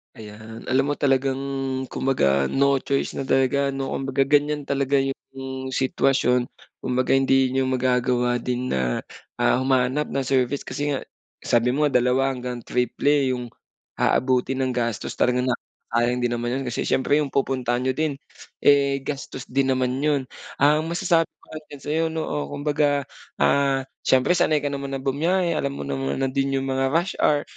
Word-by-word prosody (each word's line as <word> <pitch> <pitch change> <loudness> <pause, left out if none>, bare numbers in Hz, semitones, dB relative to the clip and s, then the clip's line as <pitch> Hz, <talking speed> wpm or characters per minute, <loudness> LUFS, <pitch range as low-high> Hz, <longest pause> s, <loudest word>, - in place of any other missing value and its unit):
Ayan, 110 +1 -10
alam 135 +2 +2
mo 145 - -4
talagang 135 -1 +1 0.5
kumbaga, 70 - +1
no 140 0 +3
choice 140 0 -1
na - - -2
talaga, 135 +1 +2
no? 135 0 -3
Kumbaga 135 0 0
ganyan 145 0 +1
talaga 140 0 +1
'yung 135 -1 -5
sitwasyon. 130 -1 +1 0.3
Kumbaga 130 +1 +1
hindi 135 0 +3
niyo 130 +1 0
magagawa 125 -1 +1
din 125 +1 -2
na, 60 -2 0 0.4
ah, - - +3
humanap 130 +2 +1
ng 135 -1 -1
service. 130 +1 0
Kasi 145 0 -2
nga, 135 - -1 0.4
sabi 120 +1 +2
mo 150 +3 +2
dalawa 125 0 +2
hanggang 125 -1 -5
triple 130 +4 +1
'yung 125 -1 -3 0.5
aabutin 130 +1 +1
ng 130 -2 -1
gastos. 115 -3 -2
Talagang, 125 +1 +1
ah, 125 - +2 0.4
sayang 120 +1 +2
din 120 -1 0
naman 120 +2 -2
'yun, - - -4
kasi 120 - -2
siyempre 130 +2 +1
'yung 150 -2 0
pupuntahan 130 -3 0
niyo 130 +1 -1
din, 150 -1 -1 0.4
eh, 140 -1 +4
gastos 135 -3 -5
din 135 +1 +1
naman 130 -1 0
'yun. 145 -3 +1 0.3
Ang 150 +3 +3
masasabi 170 -1 +2
ko - - -42
lang 155 -3 -10
sa'yo, 155 +2 0
no, 160 0 -2
o, 75 - -3
kumbaga, 145 -1 +1 0.3
ah, 140 -1 +2 0.2
siyempre 130 +5 +3
sanay 155 -4 +2
ka 145 - -1
naman 140 -1 -4
na 135 - -6
bumiyahe, 170 +6 +1
alam 140 -3 -1
mo - - -5
naman 70 0 -2
na 135 -1 -1
din 135 0 0
'yung 135 - 0
mga 135 0 0
rush 175 +3 +2
hour. 145 -1 +3
135 Hz, 170 wpm, -23 LUFS, 125-140 Hz, 0.5 s, eh